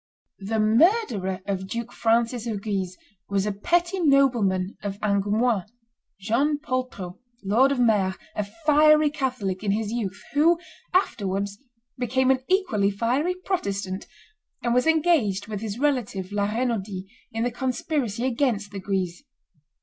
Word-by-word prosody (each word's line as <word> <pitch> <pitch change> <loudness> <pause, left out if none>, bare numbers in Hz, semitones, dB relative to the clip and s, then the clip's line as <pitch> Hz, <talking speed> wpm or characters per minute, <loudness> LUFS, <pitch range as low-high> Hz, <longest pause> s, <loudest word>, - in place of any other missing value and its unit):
The 215 +3 -2
murderer 215 - +2
of 190 -1 -3
Duke 235 +3 -5
Francis 230 +1 +1
of 205 -3 -3
Guise 190 -4 -2 0.3
was 195 0 +1
a 210 - 0
petty 345 - 0
nobleman 240 - +3
of 200 -1 -5
Angoumois, 205 +1 +1 0.5
John 250 +9 +1
Poltrot, 255 -10 -4 0.2
Lord 235 +8 +4
of 275 - 0
Mere, 205 -6 +3 0.2
a 210 - 0 0.2
fiery 305 0 +6
Catholic 225 -10 -2
in 205 - -1
his 210 +1 0
youth, 205 -5 -3
who 325 +4 +4 0.3
afterwards 200 - 0 0.4
became 260 +2 +2
an 265 - +2
equally 265 - +2
fiery 250 - 0
Protestant, 200 - -2 0.6
and 240 - +1
was 250 +5 +2
engaged 315 - +2
with 210 -2 -5
his 220 -1 -4
relative 240 -9 -1
La 205 0 0
Renaudie 215 -5 -2 0.3
in 225 +1 -2
the 245 - 0
conspiracy 250 -1 -2
against 230 -5 0
the 200 - -5
Guises. 185 -3 -2
225 Hz, 135 wpm, -25 LUFS, 200-265 Hz, 0.6 s, fiery